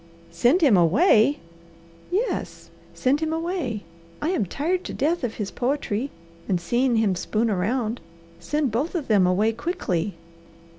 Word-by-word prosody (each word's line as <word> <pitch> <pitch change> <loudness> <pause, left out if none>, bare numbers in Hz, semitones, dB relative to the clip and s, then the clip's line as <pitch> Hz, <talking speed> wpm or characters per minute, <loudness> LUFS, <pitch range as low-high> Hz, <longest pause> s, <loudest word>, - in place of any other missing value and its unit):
"SEND 240 - +3
HIM 275 -10 +6
AWAY?" 220 - +4 0.7
"Yes, 415 +8 -2 0.2
send 270 +3 +2
him 315 0 -1
away! 325 - -2 0.4
I 305 - -1
am 320 - 0
tired 350 - -1
to - - -5
death 315 +4 0
of 235 -3 -2
his 205 -3 -4
poetry, 260 -2 -1 0.4
and 185 -3 +2
seeing 240 +7 +1
him 220 -4 +2
spoon 220 +5 0
around. 220 +5 -1 0.4
Send 295 -4 -1
both 275 - -1
of 315 -6 -2
them 200 -5 +4
away 205 +5 +2
quickly!" 210 - -2
245 Hz, 145 wpm, -24 LUFS, 210-310 Hz, 0.7 s, HIM